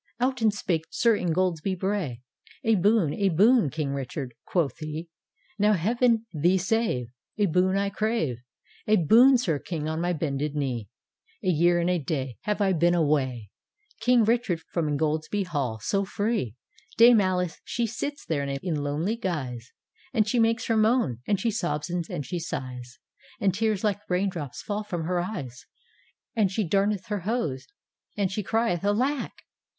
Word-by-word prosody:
" - - -51
Out 255 0 0
and 220 -1 +4
spake 170 -5 -2
Sir 230 -2 +3
Ingoldsby 180 0 0
Bray, 180 - -2 0.4
"A 225 - +3
boon, 200 -5 +3
a 200 -1 +1
boon. 210 - +4
King 145 -1 -3
Richard," 135 -1 -5
quoth 165 -6 0
he, 155 +2 -5 0.2
" - - -37
Now 210 +1 +4
Heav'n 230 +5 +2
thee 175 +5 +3
save, 185 - 0 0.3
A 205 - +3
boon 185 +2 +2
I 200 0 0
crave) 210 - -1 0.5
A 215 - +5
boon, 235 - +6
Sir 165 - 0
King, 155 -2 -4
on 160 +1 -2
my 175 +1 0
bended 150 -2 -2
knee; 125 -8 -2 0.5
A 185 - +1
year 175 +1 +3
and 170 - 0
a 180 -1 +2
day 135 -4 -3
Have 210 0 -1
I 195 -2 +3
been 175 +1 +3
away. 130 - 0 0.5
King 245 +1 +4
Richard, 220 -7 +1
from 165 -3 0
Ingoldsby 155 +6 0
Hall 140 -11 -2
so 195 - 0
free; 200 - -2 0.4
Dame 235 -1 +8
Alice 180 -3 -1
she 235 - -1
sits 280 +6 -4
there 155 -3 -1
in 140 +3 -2
lonely 150 +9 -1
guise. 130 - -4 0.4
And 215 -2 +3
she 240 +3 +1
makes 225 0 +2
her 225 - +1
moan, 220 - +2
and 200 -2 +1
she 230 +3 0
sobs 175 -6 -2
and 175 -4 -3
she 175 - -3
siglis, 125 -6 -6 0.4
And 195 -2 +2
tears 215 0 0
like 205 -2 0
rain 185 +2 +1
drops 150 -8 -6
fall 210 0 -3
from 175 -5 -4
her 175 +2 0
eyes, 140 - -5 0.7
And 210 -5 +2
she 205 -1 -1
darneth 195 +2 +1
her 210 -1 -1
hose, 180 - -2 0.5
and 200 -3 0
she 210 - -2
crieth 220 -3 0
'Alack! 250 +8 0
180 Hz, 170 wpm, -26 LUFS, 150-215 Hz, 0.7 s, Dame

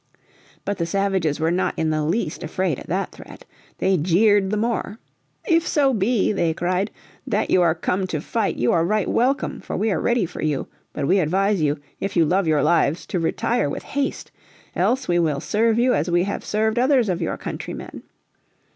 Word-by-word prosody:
But 200 -1 -2
the 170 - -1
savages 190 -5 0
were 160 +1 +1
not 180 +2 0
in 160 -1 0
the 155 0 0
least 160 +1 -1
afraid 185 -7 -2
at - - -11
that - - -2
threat. - - -13 0.3
They 190 0 +2
jeered 190 +5 +3
the 210 - 0
more. 225 -1 -2 0.5
"If 330 -1 +2
so 275 -3 +2
be," 215 0 +1
they 170 -5 0
cried, 185 +4 0 0.4
"that - - 0
you 185 - +5
are 170 -2 +3
come 185 +3 -1
to 160 -4 -2
fight 215 +7 -1
you 120 - +1
are 165 - +3
right 210 +3 0
welcome, 260 +4 0
for - - -5
we 215 +2 +1
are 180 - 0
ready 240 -4 +2
for 175 - -8
you. 150 -3 -1 0.3
But 145 - -3
we 190 +7 +3
advise 190 +3 +1
you, 150 0 +1 0.2
if 195 - -3
you 170 -2 +4
love 185 +3 +1
your 150 -3 +2
lives, 165 -2 +2
to 180 - -2
retire 225 +2 0
with - - -5
haste. 280 0 -3 0.4
Else 260 +1 +1
we 175 0 +2
will 155 -4 +1
serve 220 +7 +1
you 250 +1 +3
as 160 +4 0
we 175 0 +3
have 200 +1 -3
served 220 +2 0
others 255 -2 +3
of 180 -2 -1
your 165 - -2
countrymen." - - -7
190 Hz, 200 wpm, -22 LUFS, 165-220 Hz, 0.5 s, you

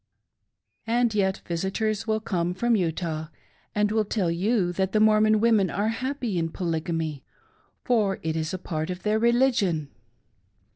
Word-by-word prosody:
And 235 0 +2
yet 190 -2 0
visitors 200 +5 -2
will 220 0 +1
come 180 -4 -1
from 235 +4 +2
Utah, 165 -4 -2 0.5
and 210 0 +2
will 220 0 +2
tell 195 -4 -1
you 185 +1 +1
that 190 +1 -1
the 215 - +3
Mormon 215 0 +4
women 215 -4 +3
are 210 +2 0
happy 245 -4 -2
in 165 0 -1
Polygamy, 160 -4 -3 0.6
for 215 -6 +1
it 160 0 -1
is 160 -1 -2
a 185 - -3
part 160 -3 -4
of 180 0 -5
their 215 +1 +1
religion. 230 - +2
195 Hz, 150 wpm, -26 LUFS, 170-220 Hz, 0.6 s, Mormon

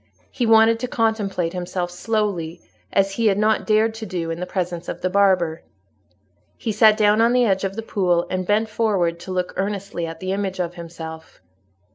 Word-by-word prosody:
He 240 - -1
wanted 225 0 +5
to 250 - -3
contemplate 205 -7 -1
himself 180 0 -3
slowly, 180 -4 -2 0.3
as 195 0 +2
he 225 +3 +1
had 195 -2 +3
not 215 +1 +1
dared 220 +1 +3
to 220 0 -7
do 170 -3 -3
in 165 - -4
the 180 - -4
presence 175 -2 -3
of - - -6
the 185 - -1
barber. 185 -5 +2 1.0
He 225 - -3
sat 215 0 +5
down 210 0 +4
on 235 +1 +4
the 250 -1 +4
edge 195 -3 +1
of 195 0 -2
the 225 - -4
pool, 180 -5 +1
and 185 -1 -3
bent 215 +2 +2
forward 200 -7 0
to 180 +2 -8
look 180 -1 -2
earnestly 195 -3 -3
at 165 0 -8
the 185 0 -3
image 195 -1 -2
of 175 -1 -2
himself. 165 -2 -9
195 Hz, 195 wpm, -22 LUFS, 175-215 Hz, 1.0 s, wanted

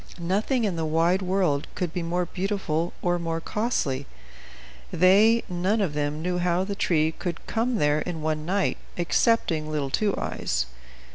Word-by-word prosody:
Nothing 205 +8 0
in 195 -6 0
the 165 - -1
wide 165 +4 +2
world 180 -6 +1
could 175 -3 -2
be 180 - -2
more 175 +2 -1
beautiful 180 -3 -2
or 175 0 +1
more 165 -1 -2
costly. 160 - -1 0.8
They 205 +6 +5
none 185 +5 0
of 190 -8 0
them 150 +1 -2
knew 180 0 0
how 175 +1 +1
the 200 +1 -3
tree 160 -6 +2
could 170 +1 -5
come 235 +2 0
there 150 -6 +2
in 160 -1 -4
one 155 -1 -1
night, 190 +4 0 0.2
excepting 170 -3 +1
little 145 -3 -2
Two 205 +4 +1
Eyes. - - -1
175 Hz, 160 wpm, -26 LUFS, 155-195 Hz, 0.8 s, They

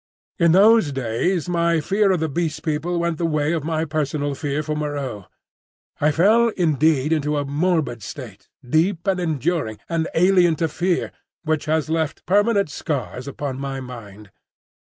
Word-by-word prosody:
In 170 -1 +5
those 205 -3 +5
days 135 +8 -1
my 170 -1 +1
fear 195 +6 +2
of 185 - +1
the 160 - +1
Beast 160 +2 -3
People 165 +3 -1
went 170 -2 -1
the 170 - 0
way 155 0 0
of 160 -4 -2
my 160 0 -1
personal 145 -1 -2
fear 145 +1 -2
for 155 0 -3
Moreau. 140 -9 -4 0.7
I 150 - +3
fell 215 +9 +4
indeed 155 -3 +2
into 150 -1 0
a 145 - -1
morbid 145 -4 0
state, 105 0 -9 0.2
deep 165 +6 +1
and 190 -2 +1
enduring, 160 -7 -1
and 165 -1 -1
alien 180 -1 +4
to 165 +2 0
fear, 175 +3 -1 0.3
which 155 -2 -1
has 155 0 0
left 160 -1 -2
permanent 200 -3 +2
scars 135 -3 -4
upon 140 -1 -5
my 135 -1 -4
mind. 105 -5 -10
155 Hz, 160 wpm, -22 LUFS, 140-175 Hz, 0.7 s, In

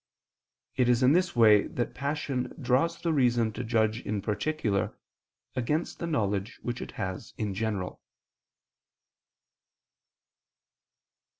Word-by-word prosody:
It 125 -1 +3
is 125 +1 +3
in 130 - +6
this 180 -1 +2
way 110 -3 +6
that 120 - -3
passion 140 -1 -2
draws 135 +6 +1
the 165 -2 0
reason 120 -5 +2
to 120 - -4
judge 110 -1 +1
in 105 -3 -2
particular, 105 -1 -1 0.6
against 150 +7 -1
the 170 - -3
knowledge 105 -8 -1
which 120 0 -3
it - - -7
has 95 +3 -5
in 105 -3 -2
general. 100 -3 -3
120 Hz, 115 wpm, -28 LUFS, 105-140 Hz, 0.6 s, in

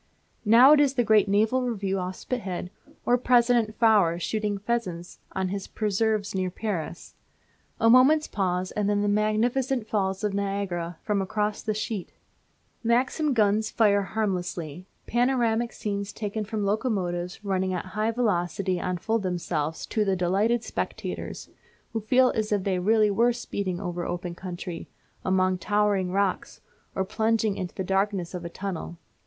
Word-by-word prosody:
Now 235 +6 +8
it 300 - +7
is 280 -2 +3
the 245 - +3
great 215 -2 +4
Naval 220 +6 +2
Review 200 -6 -1
off 185 0 -4
Spithead, 185 -8 -4 0.3
or 245 +1 +3
President 240 -3 +3
Faure 210 -7 +4
shooting 210 +2 -2
pheasants 195 -5 -3
on 190 -1 -1
his 195 0 -4
preserves 215 0 0
near 185 -1 -1
Paris. 180 -4 -5 0.7
A 225 - +3
moment's 265 +6 +6
pause 185 -2 -1
and 205 -1 -1
then 205 0 +1
the - - +1
magnificent 220 +4 +1
Falls 195 -2 -1
of 210 -1 0
Niagara 195 -4 -2
foam 205 -2 0
across 210 +2 -1
the 215 -1 -2
sheet; 210 -3 -4 0.7
Maxim 255 +6 +1
guns 215 0 +2
fire 205 -3 +3
harmlessly; 180 -5 -3 0.2
panoramic 240 -1 +1
scenes 200 -1 -4
taken 210 0 -4
from 210 -1 -2
locomotives 195 -4 -2
running 190 -1 0
at 180 -2 -3
high 215 +4 -1
velocity 185 -5 0
unfold 185 +6 -1
themselves 165 -4 -2
to 215 - 0
the 195 -2 +1
delighted 200 +6 +1
spectators, - - -5 0.5
who 225 - -1
feel 255 +4 +4
as 215 -1 -2
if 205 -2 +1
they 185 -2 0
really 210 +2 +3
were 235 +4 +3
speeding 200 -6 -3
over 175 -2 -4
open 175 0 -4
country, 175 -1 -7 0.4
among 185 0 +2
towering 205 -1 +1
rocks, 195 0 -1 0.4
or 190 - 0
plunging 220 0 +1
into 180 -2 -5
the 190 - -2
darkness 195 -1 0
of 180 -1 -5
a 170 - -5
tunnel. 175 -2 -5
205 Hz, 150 wpm, -26 LUFS, 185-225 Hz, 0.7 s, Now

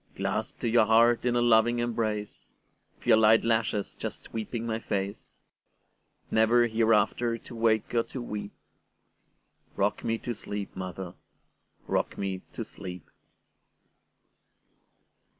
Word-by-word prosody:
Clasped - - -3
to - - 0
your 115 -1 +4
heart 115 +2 +4
in 120 -1 +2
a 120 - +3
loving 120 0 +4
embrace, 110 -3 -3 0.4
With - - -20
your - - +6
light 110 0 +5
lashes 110 -3 0
just - - -6
sweeping 115 +1 -5
my 110 -1 -2
face, 100 -2 -4 0.9
Never 115 +2 +4
hereafter 115 +1 +2
to 120 - -12
wake 115 -2 +1
or 115 - +4
to 130 - -7
weep;—Rock 105 -4 -7
me 115 0 0
to 120 +2 -4
sleep, 105 -2 -6
mother,—rock 95 -1 -6
me 95 -2 -3
to - - -5
sleep! 90 -3 -9
110 Hz, 115 wpm, -28 LUFS, 105-115 Hz, 0.9 s, your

